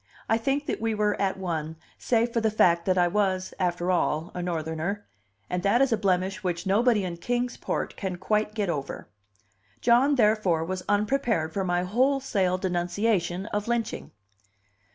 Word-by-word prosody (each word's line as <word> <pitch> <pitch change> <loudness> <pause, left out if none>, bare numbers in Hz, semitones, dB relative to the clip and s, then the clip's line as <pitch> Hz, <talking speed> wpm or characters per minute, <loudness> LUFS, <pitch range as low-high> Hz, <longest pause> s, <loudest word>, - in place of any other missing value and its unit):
I 225 - +2
think 275 +5 0
that - - -3
we 225 -1 0
were 210 0 +2
at 195 -1 0
one, 160 -4 -3 0.2
save 235 0 +1
for 230 - +1
the 220 - +2
fact 170 -5 +3
that 185 -1 +2
I 175 -1 +4
was, 190 -1 0
after 180 0 0
all, 165 -2 0
a 180 - -4
Northerner 170 +3 -3 0.4
and 180 - -2
that 200 +6 +3
is 270 -1 +3
a - - +4
blemish 195 0 0
which 175 0 -2
nobody 210 +2 +3
in 175 -2 -4
Kings 245 +6 -1
Port - - -3
can 190 -3 -3
quite 210 +3 -1
get 210 -3 0
over. 145 -5 -4 0.7
John, 250 +5 +4
therefore, 210 -8 +2
was 185 +1 -3
unprepared 210 -6 +1
for 195 - -1
my 175 -1 0
wholesale 230 -3 +1
denunciation 180 +1 0
of 210 +1 -1
lynching. 235 -1 -2
195 Hz, 170 wpm, -26 LUFS, 175-225 Hz, 0.7 s, I